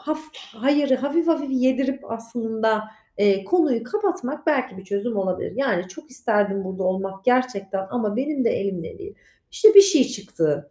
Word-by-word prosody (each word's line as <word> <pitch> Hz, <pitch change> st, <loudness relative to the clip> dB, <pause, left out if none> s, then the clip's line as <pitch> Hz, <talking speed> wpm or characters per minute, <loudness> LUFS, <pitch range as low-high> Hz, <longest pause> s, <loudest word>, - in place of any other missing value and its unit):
haf 310 Hz, +1 st, -3 dB, 0.2 s
hayırı 275 Hz, +4 st, 0 dB
hafif 285 Hz, +6 st, -1 dB
hafif 305 Hz, -4 st, 0 dB
yedirip 265 Hz, +1 st, 0 dB
aslında, 225 Hz, -1 st, -2 dB, 0.4 s
eee, 200 Hz, -1 st, +3 dB
konuyu 305 Hz, -, +2 dB
kapatmak 340 Hz, -6 st, -3 dB
belki 260 Hz, -9 st, 0 dB
bir 190 Hz, -, -11 dB
çözüm 200 Hz, +4 st, -3 dB
olabilir. 190 Hz, -2 st, -2 dB
Yani, 200 Hz, -10 st, 0 dB
"Çok 305 Hz, +10 st, -13 dB
isterdim 205 Hz, -5 st, 0 dB
burada 190 Hz, 0 st, -5 dB
olmak 195 Hz, +1 st, -3 dB
gerçekten 200 Hz, -7 st, 0 dB
ama 220 Hz, -4 st, -2 dB
benim 270 Hz, 0 st, -1 dB
de -, -, +3 dB
elimde 190 Hz, -, -4 dB
değil. 400 Hz, +1 st, -10 dB, 0.4 s
İşte, 430 Hz, -1 st, +5 dB
bir 400 Hz, -, +13 dB
şey 350 Hz, -9 st, +4 dB
çıktı. 160 Hz, -, -3 dB
240 Hz, 155 wpm, -23 LUFS, 195-285 Hz, 0.4 s, bir